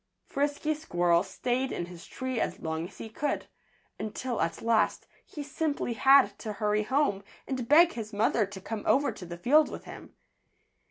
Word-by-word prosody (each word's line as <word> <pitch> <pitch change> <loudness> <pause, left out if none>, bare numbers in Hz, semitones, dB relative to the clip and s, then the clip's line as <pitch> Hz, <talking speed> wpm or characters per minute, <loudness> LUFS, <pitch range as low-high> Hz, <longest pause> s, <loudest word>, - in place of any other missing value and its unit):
Frisky 290 +2 -1
Squirrel 175 - +2
stayed 250 +7 -2
in 175 - -3
his 175 -1 -11
tree 260 -2 -3
as - - -2
long 160 +1 -3
as 190 - -17
he - - -7
could, 280 +7 -2 0.5
until 235 +3 -3
at 165 0 -2
last 225 -1 +2 0.2
he 295 - -7
simply 290 -3 -2
had 270 +3 +5
to 215 -2 -4
hurry 210 +1 +1
home 215 -4 +1 0.2
and 255 -3 -3
beg 335 +5 +7
his 220 -2 -6
mother 210 0 +2
to 195 -1 -9
come 215 +3 -5
over 280 +2 +3
to 180 - -10
the 170 0 -7
field 295 - +4
with - - -7
him. - - -11
230 Hz, 175 wpm, -29 LUFS, 200-280 Hz, 0.5 s, beg